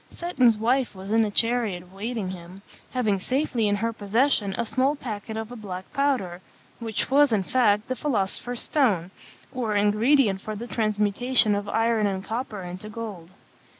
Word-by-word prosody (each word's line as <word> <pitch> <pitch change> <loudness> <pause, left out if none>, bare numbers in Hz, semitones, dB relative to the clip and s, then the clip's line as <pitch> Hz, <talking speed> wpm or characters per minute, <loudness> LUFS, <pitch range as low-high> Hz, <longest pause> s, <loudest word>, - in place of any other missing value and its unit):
Seton's 255 -10 +2
wife 245 +2 +1
was 190 +2 -7
in 225 - +5
the 215 - +1
chariot 225 -4 +1
awaiting 195 +2 -4
him, 185 +2 -10 0.3
having 215 -6 0
safely 255 0 0
in 205 - +2
her 230 +3 -1
possession 215 0 +1
a 235 - 0
small 265 +5 +1
packet 220 -4 -6
of 220 +1 -5
a - - -7
black 190 -4 -7
powder, 255 -12 0 0.4
which 225 +1 -3
was, 285 0 +5
in 205 -3 +2
fact, 215 -1 +2
the 255 - -2
philosopher's 245 -2 -2
stone, 200 - +1 0.4
or 230 -5 -1
ingredient 210 +1 +3
for 215 +1 -5
the 225 +3 -6
transmutation 215 +1 +1
of 205 0 -2
iron 225 -2 +2
and 190 -1 -3
copper 220 -3 -4
into 180 +4 -7
gold. 210 -7 -7
220 Hz, 165 wpm, -25 LUFS, 200-245 Hz, 0.4 s, in